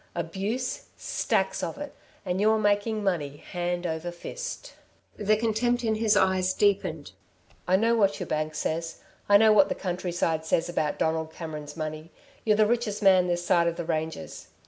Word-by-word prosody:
Abuse? 195 +9 -3
Stacks - - -1
of - - -4
it! 290 -1 -7 0.3
And 185 +1 -1
you're 220 +1 +4
making 210 +1 +1
money, 150 -7 -1
hand 175 +2 -3
over 160 +1 -3
fist." - - -7 0.4
The 215 +1 +2
contempt 240 +2 0
in 220 -1 +1
his 215 -1 +2
eyes 185 -1 +2
deepened. 200 -1 +1 0.6
"I 185 - +4
know 225 +4 +3
what 200 -3 +2
your 180 - -3
bank 155 -1 -2
says. 165 +2 -3 0.3
I 205 - +8
know 220 +1 +6
what 200 -2 +5
the - - -1
countryside 175 -3 -2
says 165 +1 +1
about 155 -4 -1
Donald 160 0 -1
Cameron's 155 -2 -7
money. 155 0 -5 0.3
You're 215 -2 +3
the 215 - +5
richest 220 -2 -1
man 185 -2 +6
this 175 0 -1
side 170 -1 +3
of 170 - 0
the 170 - -4
ranges.... 160 - -4
185 Hz, 170 wpm, -27 LUFS, 165-215 Hz, 0.6 s, I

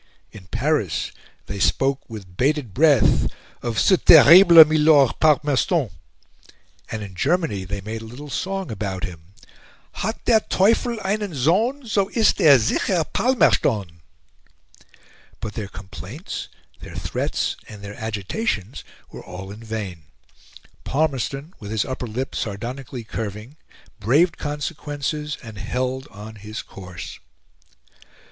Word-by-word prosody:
In 95 -4 -13
Paris 120 - -1 0.3
they 100 - -6
spoke 135 +10 +1
with 100 -5 -10
bated 135 -2 0
breath 140 - +4 0.3
of 115 -2 -3
"ce 190 - +4
terrible 165 +2 +9
milord 150 -4 +4
Palmerston;" 150 - +2 1.0
and 110 -1 -4
in 100 -2 -9
Germany 135 - 0
they 100 +1 -5
made 110 +3 -6
a - - -9
little 125 +7 -10
song 190 -2 -3
about 95 -3 -4
him 85 +1 -8 0.6
"Hat 220 +4 -3
der 225 -2 +5
Teufel 230 +4 +2
einen 200 -3 -2
Sohn, 215 - +1
So 200 -3 0
ist 220 -2 +3
er 145 -5 +8
sicher 160 - +1
Palmerston." 110 - +1 1.4
But 110 - -5
their 105 -3 -5
complaints, 100 - -8 0.3
their - - -11
threats, - - -2
and 105 -1 -11
their 100 0 -7
agitations 110 - -3 0.3
were - - -10
all 90 +2 -9
in 105 +3 -10
vain. 100 -8 -6 0.8
Palmerston, 140 +1 -2
with 105 -4 -8
his 110 -1 0
upper 130 -2 -4
lip 125 +4 -4
sardonically 120 +4 -5
curving, 110 +4 -6 0.4
braved 145 - +3
consequences, 150 0 -4
and 110 -4 -9
held 130 +5 -3
on 105 +2 -11
his 105 +2 -7
course. 90 -3 -10
125 Hz, 125 wpm, -22 LUFS, 105-155 Hz, 1.4 s, terrible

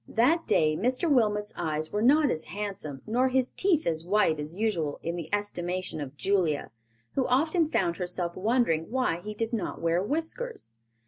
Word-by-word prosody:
That 315 +9 +2
day 155 -1 +3
Mr. 250 - 0
Wilmot's 210 -7 +2
eyes 155 0 -2
were 210 - -1
not 290 +5 +5
as 160 - -2
handsome 190 -9 -5
nor 245 +4 +2
his 255 -1 +1
teeth 365 -6 +2
as 160 -1 0
white 180 -4 +2
as 150 +4 -6
usual 175 -10 -1
in 170 +1 -2
the 170 -3 -6
estimation 185 -5 -2
of 140 0 -7
Julia, 180 - 0 0.4
who 265 - +1
often 315 +5 +2
found 170 - +1
herself 175 -1 -2
wondering 200 -6 +1
why 250 -8 0
he 210 +3 -7
did 225 +2 -3
not 220 - -2
wear 170 +1 +1
whiskers. 330 - -3
205 Hz, 175 wpm, -28 LUFS, 165-255 Hz, 0.4 s, not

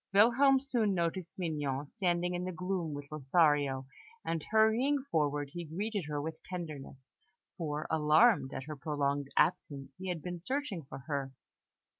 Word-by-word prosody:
Wilhelm 260 +6 +6
soon 235 -7 0
noticed 170 0 -2
Mignon 145 -5 -2
standing 180 -4 0
in 175 0 -2
the 185 - -3
gloom 180 -3 -2
with 145 0 -6
Lothario, 145 -2 +2 0.4
and 165 -1 -1
hurrying 230 +6 +3
forward, 145 -2 0
he 175 - -4
greeted 200 +4 -3
her 150 -1 -2
with 160 +2 -5
tenderness, 155 -7 -7 0.6
for, 150 -3 -3
alarmed 155 - +4
at 130 - -5
her 155 +2 -6
prolonged 145 -1 -1
absence, 135 -2 +1
he 190 0 -4
had 170 -4 -3
been 180 -1 -4
searching 255 - -2
for 135 0 -9
her. 140 -3 -3
165 Hz, 150 wpm, -32 LUFS, 145-190 Hz, 0.6 s, Wilhelm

